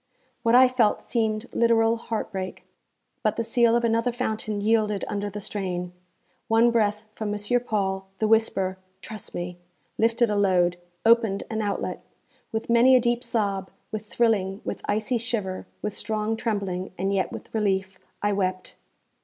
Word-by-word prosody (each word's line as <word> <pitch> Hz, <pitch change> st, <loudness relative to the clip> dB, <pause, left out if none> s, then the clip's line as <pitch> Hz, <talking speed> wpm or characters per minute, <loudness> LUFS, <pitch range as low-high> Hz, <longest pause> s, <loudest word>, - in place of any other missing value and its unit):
What 235 Hz, 0 st, +3 dB
I 255 Hz, +1 st, +8 dB
felt 250 Hz, -4 st, +2 dB
seemed 220 Hz, -1 st, 0 dB
literal 230 Hz, -1 st, +4 dB
heartbreak; 205 Hz, -5 st, -4 dB, 0.6 s
but 215 Hz, -3 st, +1 dB
the 230 Hz, -, -1 dB
seal 235 Hz, 0 st, +3 dB
of 235 Hz, -, +2 dB
another 230 Hz, +1 st, +2 dB
fountain 220 Hz, -3 st, -2 dB
yielded 210 Hz, -1 st, +1 dB
under 205 Hz, 0 st, -2 dB
the 205 Hz, +1 st, -6 dB
strain. 180 Hz, -3 st, -3 dB, 0.6 s
One 230 Hz, +1 st, +4 dB
breath 210 Hz, -2 st, +1 dB
from 215 Hz, -1 st, -4 dB
M. 210 Hz, -, -2 dB, 0.3 s
Paul, 190 Hz, -2 st, -1 dB
the 220 Hz, -, +1 dB
whisper, 195 Hz, -4 st, +2 dB, 0.2 s
'Trust 215 Hz, -3 st, -7 dB
me!' 175 Hz, 0 st, -5 dB, 0.4 s
lifted 230 Hz, 0 st, +3 dB
a -, -, +1 dB
load, 180 Hz, -3 st, +3 dB, 0.3 s
opened 225 Hz, -4 st, +4 dB
an 220 Hz, 0 st, -1 dB
outlet. 205 Hz, -1 st, -2 dB, 0.5 s
With 220 Hz, 0 st, -3 dB
many 235 Hz, +3 st, +6 dB
a -, -, +7 dB
deep 240 Hz, 0 st, 0 dB
sob, 200 Hz, -6 st, -1 dB, 0.2 s
with 215 Hz, 0 st, -5 dB
thrilling, 210 Hz, -4 st, +1 dB
with -, -, -4 dB
icy 215 Hz, +4 st, 0 dB
shiver, 215 Hz, -5 st, -3 dB, 0.2 s
with 210 Hz, -, -2 dB
strong 215 Hz, +1 st, -1 dB
trembling, 200 Hz, -5 st, -2 dB
and 195 Hz, +2 st, 0 dB
yet 190 Hz, -1 st, 0 dB
with -, -, -9 dB
relief, 195 Hz, -3 st, 0 dB, 0.2 s
I 205 Hz, 0 st, +2 dB
wept. 185 Hz, -2 st, -2 dB
215 Hz, 155 wpm, -25 LUFS, 195-230 Hz, 0.6 s, I